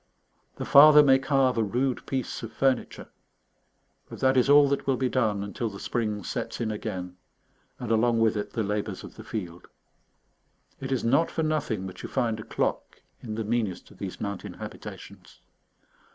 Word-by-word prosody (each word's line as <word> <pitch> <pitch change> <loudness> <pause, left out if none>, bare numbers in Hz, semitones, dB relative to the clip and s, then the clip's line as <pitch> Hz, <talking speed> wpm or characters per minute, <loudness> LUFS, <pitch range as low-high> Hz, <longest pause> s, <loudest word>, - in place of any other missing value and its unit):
The - - -5
father 150 +1 +8
may 135 -2 +5
carve 135 -3 +2
a - - +3
rude 125 +5 -1
piece 130 -2 -3
of 115 - -7
furniture, 130 0 -1 1.0
but - - -9
that 130 0 +3
is 130 +1 +3
all 145 0 +7
that 140 - -2
will 135 -2 +2
be 130 0 0
done 110 -6 0
until 105 +3 -3
the 100 -1 -10
spring 105 -4 -2
sets - - -4
in 110 -2 -1
again, 95 -4 -5 0.6
and 120 -2 -5
along 115 +1 +3
with 110 -1 +3
it 105 - -4
the 110 - -1
labours 105 +1 -3
of - - -10
the - - -10
field. 90 -5 -6 1.1
It 135 0 -5
is 130 - 0
not 160 +8 +3
for 160 - -2
nothing 150 -11 -1
that 95 - -8
you - - -7
find 115 -4 -1
a - - -6
clock - - -3 0.2
in 110 -2 -6
the 110 - -2
meanest 110 -4 -2
of - - -18
these 95 -2 -6
mountain 100 -2 -5
habitations. - - -10
115 Hz, 180 wpm, -27 LUFS, 105-135 Hz, 1.1 s, father